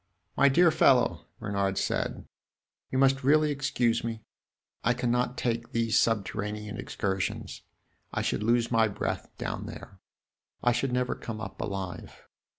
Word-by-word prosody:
"My 140 - +5
dear 170 +4 +5
fellow," 130 -5 +3
Bernard 100 -3 -1
said, - - -1 0.6
"you 130 - -2
must 135 0 +3
really 150 +2 +4
excuse 135 -4 +1
me; 115 -2 -4 0.6
I 120 - +3
cannot 125 0 0
take 115 -1 -2
these 115 -1 +1
subterranean 105 -1 0
excursions. 95 -1 -3 0.5
I - - -1
should - - -1
lose 115 +2 +2
my 115 -2 +4
breath 100 - -3
down - - -4
there; 95 - -10 0.6
I 120 - +5
should 125 +2 0
never 125 0 0
come 110 -2 -6
up 110 - -6
alive. 95 -3 -5
115 Hz, 140 wpm, -28 LUFS, 105-125 Hz, 0.6 s, My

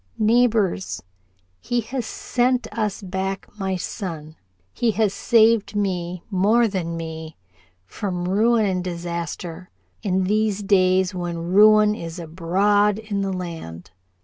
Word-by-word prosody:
"Neighbors 220 - +2 0.6
he 240 - -1
has 240 +1 -4
sent 250 +2 0
us 210 -2 -2
back 190 +1 -3
my 190 -1 -1
son. 165 -5 -6 0.4
He 240 - +1
has 210 -2 +1
saved 220 -2 +3
me 180 -3 -2
more 215 +5 +3
than 170 -5 -3
me 160 -1 -7 0.5
from 180 - -4
ruin 220 +4 +3
and 185 -2 -1
disaster, 170 0 -5 0.3
in 190 -3 0
these 210 +1 0
days 185 -1 +3
when 175 -1 -4
ruin 210 +1 +6
is 165 -4 -7
abroad 190 +5 +1
in 210 -2 -3
the 195 0 -1
land. 165 - -7
190 Hz, 120 wpm, -22 LUFS, 175-215 Hz, 0.6 s, ruin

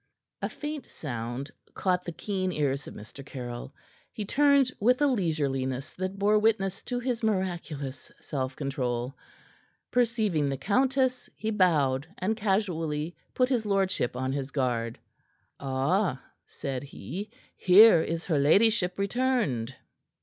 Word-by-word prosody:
A - - -1
faint 295 -1 -6
sound 120 0 -5 0.2
caught 180 -1 0
the 175 - -3
keen 185 +1 -2
ears 140 -3 -1
of - - -9
Mr. 110 +6 -10
Caryll. 125 -2 -7 0.4
He 210 - -5
turned 280 +2 +4
with 250 +5 +4
a 295 - +4
leisureliness 145 - -1
that 185 +1 -4
bore 210 +2 +4
witness 210 -3 +1
to 245 - -2
his 245 -1 -2
miraculous 175 - -2
self 130 -2 -3
control. 130 -3 -2 0.8
Perceiving 220 - +2
the 135 - -2
countess, 255 - +1
he 220 - -2
bowed, 150 -9 +2
and 210 +5 0
casually 175 -7 -1 0.2
put 255 0 +3
his 245 -4 +1
lordship 195 - 0
on 130 +1 -1
his 135 -1 -3
guard. 120 -5 -1 0.6
"Ah!" 135 +4 0 0.3
said 135 -4 -4
he. 145 - -7 0.3
"Here 190 -1 +7
is 165 +1 -3
her 155 -6 +1
ladyship 180 +5 +4
returned." 200 - 0
180 Hz, 130 wpm, -28 LUFS, 135-215 Hz, 0.8 s, Here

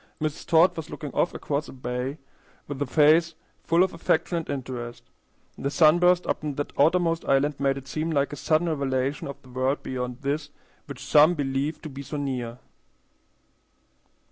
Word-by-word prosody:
Mrs. 155 -1 -3
Todd 165 +2 +5
was 160 -1 -6
looking 145 -3 -7
off 175 - +1
across 145 0 -2
the - - -9
bay 125 +2 -4 0.5
with 145 -1 -6
a 145 - 0
face 155 +3 +4 0.3
full 170 +2 +4
of 190 - -1
affection 165 +1 0
and 165 - -8
interest. 125 -3 -5 0.6
The 140 - -1
sunburst 175 +4 +4
upon 150 -2 -2
that 145 - -4
outermost 165 +2 +3
island 140 +1 +2
made 135 -1 +1
it 135 -1 -9
seem 155 +4 -2
like 145 -2 0
a - - -3
sudden 155 +4 +1
revelation 140 -2 -1
of 140 - -7
the 130 - -16
world 130 +3 -1
beyond 125 0 -5
this 145 +2 -2 0.4
which 140 -2 -8
some 150 +5 +6
believe 140 +2 -2
to 155 - -6
be 140 0 -8
so 150 +2 -6
near. 125 -4 -3
145 Hz, 170 wpm, -26 LUFS, 135-160 Hz, 0.6 s, some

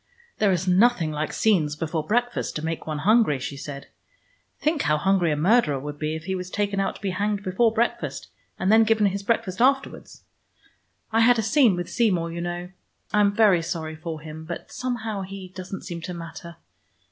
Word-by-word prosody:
"There 205 -2 +4
is 185 0 -1
nothing 185 -3 +3
like 150 +1 -2
scenes 165 -9 +2
before 160 0 -2
breakfast 240 +7 -1
to 155 - -3
make 165 0 -4
one 155 -1 -2
hungry," 215 - +4
she 130 +2 -5
said. 140 0 -7 0.7
"Think 305 -1 +1
how 150 - +2
hungry 180 0 +2
a - - +1
murderer 160 - +3
would 145 +1 -7
be 155 0 -2
if 160 - -7
he 190 +3 -3
was 180 -1 -4
taken 200 0 -1
out 195 - -1
to - - -13
be 195 - 0
hanged 205 +2 -1
before 200 +5 +2
breakfast, 235 +2 -2 0.3
and 190 - +1
then 225 +1 +7
given 220 -1 +3
his 200 0 0
breakfast 200 -1 -1
afterwards. 270 +1 0 0.9
I 225 - +2
had 240 +1 +5
a 225 - 0
scene 225 -2 +4
with 175 -1 -4
Seymour, 180 -8 +1
you 170 +1 -5
know. 175 +1 -4 0.4
I 210 - +4
am 205 -1 +4
very 205 -6 +5
sorry 160 -2 -4
for 160 -1 -6
him, 155 0 -8
but 170 +2 -7
somehow 225 -5 -3
he 190 -1 -8
doesn't 185 +1 -7
seem 170 -1 -6
to 180 +1 -6
matter. 170 0 -9
185 Hz, 200 wpm, -24 LUFS, 160-215 Hz, 0.9 s, then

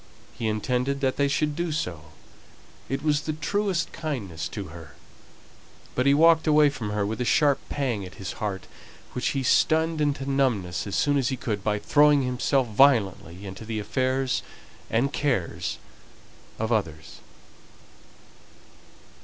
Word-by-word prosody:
He 115 0 -3
intended 125 +5 -1
that 130 -1 0
they 140 - +3
should 150 +1 0
do 170 0 -2
so; 90 - -3 0.8
it 135 +1 -2
was 150 -1 +2
the 155 - -3
truest 185 +4 -1
kindness 100 - -4
to 100 -6 -6
her; 80 -3 -12 1.0
but 125 +2 +1
he 140 - +6
walked 160 +1 +5
away 150 -1 +5
from 115 -7 -5
her 105 -1 -1
with 110 +4 -3
a - - +2
sharp 145 +2 +3
pang 125 -8 -1
at 90 - -10
his 95 - -5
heart, 100 -3 -3 0.5
which 125 - -1
he 135 - -1
stunned 160 +4 +2
into 140 -2 0
numbness 115 -12 0
as 100 - -3
soon 145 -1 +2
as 135 -1 +1
he 130 - -2
could 110 -9 -3
by 105 0 +1
throwing 145 +5 +4
himself 125 +1 +1
violently 100 -7 +2
into 95 +2 -8
the 110 0 -4
affairs 130 +5 0 0.5
and 135 +5 +1
cares 100 - -1 0.8
of 110 +1 -2
others. 80 -8 -2
130 Hz, 150 wpm, -26 LUFS, 105-145 Hz, 1.0 s, he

